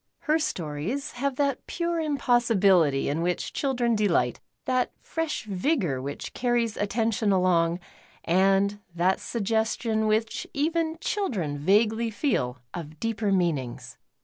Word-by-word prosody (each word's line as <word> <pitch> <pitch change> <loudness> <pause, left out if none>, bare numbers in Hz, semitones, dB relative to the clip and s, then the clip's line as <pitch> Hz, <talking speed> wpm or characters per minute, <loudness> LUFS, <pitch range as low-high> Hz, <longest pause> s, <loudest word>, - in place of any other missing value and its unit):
Her 310 +1 +2
stories 180 - -3
have 275 +2 -2
that 280 -1 -1
pure 340 -1 -1
impossibility 225 - +3
in 150 +4 -1
which 175 +1 -1
children 245 -4 0
de 210 -1 +2
lii^ht. 125 -9 +1 0.3
that 255 -1 +1
fresh 325 -7 -3
vioror 190 - 0
which 140 +2 -6
carries 240 -3 0
attention 215 0 0
along:, 175 -2 +2 0.5
and 195 +3 +3 0.2
that 180 +2 +2
suggestion 220 0 0
which 220 +1 0
even 320 +2 0
children 190 - -2
vaguelv 220 +7 +2
feel 125 - 0 0.2
of 155 -3 -7
deeper 225 -2 -1
meanings. 160 -10 -1
215 Hz, 120 wpm, -26 LUFS, 175-250 Hz, 0.5 s, impossibility